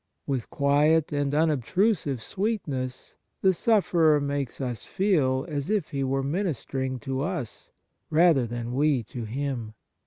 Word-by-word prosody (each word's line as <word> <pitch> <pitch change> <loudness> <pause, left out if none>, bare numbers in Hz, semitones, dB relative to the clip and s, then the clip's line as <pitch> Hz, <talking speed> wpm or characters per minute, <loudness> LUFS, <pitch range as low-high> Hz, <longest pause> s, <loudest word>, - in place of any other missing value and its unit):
With 135 -5 -2
quiet 150 +3 +3
and 145 -1 0
unobtrusive 155 - +1
sweetness 145 - -3 0.3
the 190 -1 +5
sufferer 170 -7 +3
makes 140 -3 -3
us 125 -5 -3
feel 150 -9 +1
as 145 0 -3
if 210 -2 0
he 140 -2 -1
were 135 +1 0
ministering 135 - -2
to 135 -2 -3
us 160 - -4 0.4
rather 160 -6 +4
than 120 +1 -4
we 140 -2 +2
to 115 +1 -7
him. 120 -2 -4
140 Hz, 130 wpm, -26 LUFS, 130-165 Hz, 0.4 s, the